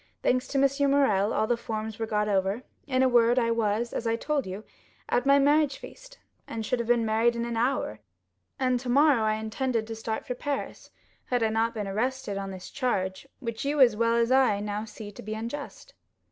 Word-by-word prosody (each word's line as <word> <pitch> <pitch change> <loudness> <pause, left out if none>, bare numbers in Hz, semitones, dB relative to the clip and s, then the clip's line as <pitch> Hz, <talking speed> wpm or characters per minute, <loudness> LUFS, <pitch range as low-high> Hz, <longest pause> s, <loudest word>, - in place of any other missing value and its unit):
Thanks 255 +1 +1
to 280 - -2
M. 275 +1 +3
Morrel, 220 -8 +3
all 215 - +1
the 240 - +1
forms 220 -2 -5
were 225 - -2
got 210 -1 0
over; 195 +3 0 0.2
in 260 -1 +2
a - - +5
word 240 0 +4
I 230 -2 +2
was, 230 +1 0
as 230 - -2
I 225 - +2
told 285 0 -1
you, 190 +3 -6 0.4
at 245 +2 0
my 280 0 +6
marriage 285 0 +3
feast; - - -13 0.3
and - - -7
I - - -1
should 245 +3 -1
have 235 - -2
been 240 -1 +3
married 225 +2 +2
in 235 0 -2
an 235 -1 -3
hour, 230 - 0 0.6
and 255 -2 +1
tomorrow 265 +1 +3
I 215 0 +2
intended 220 +2 -2
to 225 0 -6
start 220 0 -4
for 250 - -3
Paris, 280 +2 -5 0.4
had 245 -2 0
I 220 - +2
not 225 +1 0
been 210 -2 -3
arrested 240 +2 -2
on 195 0 -5
this 185 -1 -9
charge 190 -3 -2
which 230 -2 -4
you 290 +1 -1
as 245 -5 +6
well 230 +1 +2
as 235 +1 +2
I 260 -6 +4
now 210 +1 -3
see 210 -1 -9
to - - -11
be 215 +1 -5
unjust." 235 +6 -7
230 Hz, 215 wpm, -27 LUFS, 215-260 Hz, 0.6 s, my